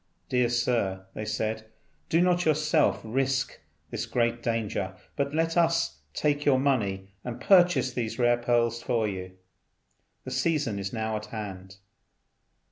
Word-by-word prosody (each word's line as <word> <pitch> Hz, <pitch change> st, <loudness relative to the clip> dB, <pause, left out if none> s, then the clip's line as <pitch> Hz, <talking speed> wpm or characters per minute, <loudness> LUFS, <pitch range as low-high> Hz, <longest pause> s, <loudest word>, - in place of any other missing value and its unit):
"Dear 125 Hz, -1 st, +2 dB
Sir," 115 Hz, -6 st, 0 dB
they 110 Hz, -, -5 dB
said, 110 Hz, +1 st, -2 dB, 0.4 s
"do 165 Hz, -, +3 dB
not 180 Hz, 0 st, +3 dB
yourself 150 Hz, -, +2 dB
risk 135 Hz, +3 st, -1 dB, 0.3 s
this -, -, -3 dB
great 120 Hz, -1 st, 0 dB
danger, 105 Hz, -5 st, -2 dB, 0.2 s
but 140 Hz, +1 st, -1 dB
let 165 Hz, +1 st, +1 dB
us 165 Hz, -, +2 dB, 0.2 s
take 145 Hz, -1 st, +1 dB
your 140 Hz, -3 st, +4 dB
money 100 Hz, -8 st, 0 dB
and 120 Hz, -1 st, -5 dB
purchase 175 Hz, -10 st, +4 dB
these 115 Hz, -3 st, -3 dB
rare 120 Hz, -1 st, +4 dB
pearls 120 Hz, -1 st, +1 dB
for 115 Hz, -2 st, 0 dB
you. 95 Hz, -2 st, -5 dB, 0.9 s
The 130 Hz, -, -7 dB
season 130 Hz, -5 st, 0 dB
is 100 Hz, 0 st, -4 dB
now 110 Hz, -1 st, -2 dB
at 105 Hz, 0 st, -8 dB
hand." 95 Hz, -4 st, -7 dB
120 Hz, 140 wpm, -27 LUFS, 105-140 Hz, 0.9 s, your